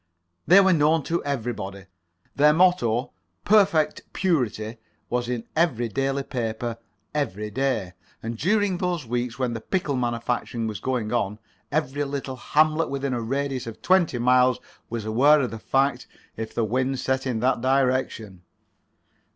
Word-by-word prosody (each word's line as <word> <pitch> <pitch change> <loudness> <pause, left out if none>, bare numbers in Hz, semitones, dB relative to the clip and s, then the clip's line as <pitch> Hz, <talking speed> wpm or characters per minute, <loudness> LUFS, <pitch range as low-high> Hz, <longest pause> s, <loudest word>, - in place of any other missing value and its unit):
They 185 +3 +8
were 190 -1 +4
known 155 0 +3
to 170 +4 -1
everybody. 110 -8 -4 0.5
Their 150 +1 +5
motto—"Perfect 170 - +2
Purity"—was 120 - -2
in 120 -2 -2
every 130 -8 +1
daily 135 +4 -1
paper 115 -2 -3 0.3
every 105 -8 -2
day. 110 -7 -1 0.3
And 115 +1 -4
during 190 - +1
those 175 -5 -1
weeks 120 0 -2
when 125 -2 -1
the 115 - -5
pickle 150 - -1
manufacturing 120 -1 -2
was 110 -4 -4
going 120 -3 -2
on, 105 -3 0 0.3
every 145 -1 0
little 140 -2 -4
hamlet 155 +5 +2
within 140 -1 -2
a 120 - -2
radius 135 +1 -2
of 115 - -9
twenty 180 -8 +3
miles 125 +1 +4 0.3
was 115 -2 -4
aware 135 +8 +5
of 125 - -2
the 115 - -6
fact 135 +1 0 0.3
if 110 0 -5
the 115 - +1
wind 130 +4 -1
set 130 0 -1
in 120 -3 -1
that 125 -1 +1
direction. 130 -7 0
130 Hz, 145 wpm, -24 LUFS, 115-145 Hz, 0.5 s, They